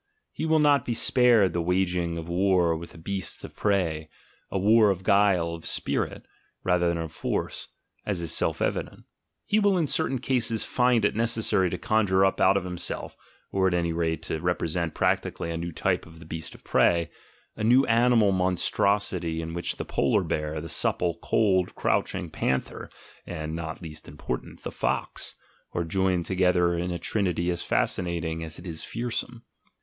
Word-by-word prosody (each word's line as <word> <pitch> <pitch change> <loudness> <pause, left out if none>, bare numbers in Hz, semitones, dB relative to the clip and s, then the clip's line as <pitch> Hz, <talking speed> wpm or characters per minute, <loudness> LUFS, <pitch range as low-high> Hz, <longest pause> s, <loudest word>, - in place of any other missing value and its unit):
He - - -3
will 160 0 +4
not 145 -2 +4
be 120 - -2
spared 115 -7 +4
the 85 - 0
waging 90 -1 0
of 80 0 -6
war 90 -1 +2
with 85 +1 -7
the - - -13
beasts 95 +2 -4
of - - -9
prey, 85 -7 0 0.4
a - - -2
war 105 +2 +5
of 95 -1 -1
guile 95 -4 +3
(of 85 -1 -8
"spirit") - - -2 0.4
rather 90 -1 +2
than 85 0 +1
of 80 -2 -4
force, - - -3 0.4
as 100 -4 -2
is 85 -1 -3
self - - -1
evident - - -3 0.2
— - - -55
he 215 - +2
will 200 -2 +3
in 165 - +2
cer 160 +2 +1
tain 135 - -1
cases 120 -3 0
find 125 -3 +2
it - - +1
necessary 110 -5 +1
to - - -3
conjure 95 -3 +2
up 95 - 0
out 95 +1 +5
of 100 - -1
himself, 90 -1 -4 0.4
or 95 -1 +2
at 90 - +1
any 85 -1 0
rate 80 -1 -1
to 80 - -3
represent 85 -1 -1
practically 85 - 0
a 85 - -3
new 85 +1 -4
type 80 - -1
of 80 +1 -14
the 80 - -13
beast 80 0 -6
of - - -17
prey 85 -2 +2 0.2
— - - -35
a - - -4
new 125 +5 +5
animal 115 -3 +4
monstrosity 95 -1 +1
in 80 0 -5
which 85 +1 -3
the - - -5
polar - - +1
bear, 75 0 -2
the 80 - -6
supple, 85 +1 0
cold, 95 -5 +2
crouching 95 -2 0
panther, 65 -3 -2 0.4
and, 80 0 -4
not 80 +1 -6
least 75 -2 -8
important, 70 -4 -6
the - - -4
fox, - - -2 0.4
are 85 - 0
joined 90 0 0
together 90 -1 +2
in 90 +1 -2
a 90 - -2
trinity 90 -2 0
as 85 -1 -3
fascinating 85 -2 -1
as 80 -1 -5
it 85 - -11
is 80 -3 -5
fearsome. 120 0 -4
90 Hz, 185 wpm, -26 LUFS, 85-105 Hz, 0.4 s, war